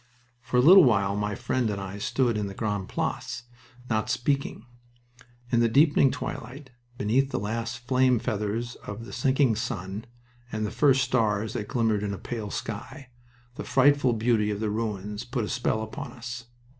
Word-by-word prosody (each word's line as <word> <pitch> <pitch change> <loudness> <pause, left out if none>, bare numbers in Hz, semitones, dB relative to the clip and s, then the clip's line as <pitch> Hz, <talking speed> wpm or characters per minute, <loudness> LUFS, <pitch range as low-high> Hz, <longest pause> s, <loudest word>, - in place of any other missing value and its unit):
For 130 -1 -1
a - - +6
little 180 +7 +9
while 100 -6 +3
my 105 0 -1
friend 120 +2 -1
and 100 -1 -2
I 100 +1 -6
stood 120 +2 +1
in 105 -1 -1
the 100 - -8
Grande 105 -3 -2
Place, 120 - -3 0.4
not 110 0 0
speaking. 125 -1 -1 0.9
In 120 - +3
the 115 0 +3
deepening 140 +2 +5
twilight, 135 +3 -6 0.3
beneath 125 +6 +2
the - - -2
last 115 +4 -4
flame 130 -1 +4
feathers 110 +2 -2
of 105 +3 -8
the - - -10
sinking 130 -1 +2
sun 105 -3 -4 0.5
and 110 0 -2
the 105 - -3
first 135 -1 +4
stars 110 -4 +1
that 105 - -4
glimmered 115 -4 +1
in 100 -1 -2
a - - -9
pale 110 -2 -5
sky, 115 +7 -6 0.5
the 150 - -4
frightful 135 -1 +4
beauty 110 -1 +1
of 105 -1 -2
the 110 -1 -1
ruins 105 -2 -3
put 120 -2 -2
a - - -6
spell 110 -3 0
upon 110 - -7
us. 120 0 -7
115 Hz, 175 wpm, -27 LUFS, 105-125 Hz, 0.9 s, little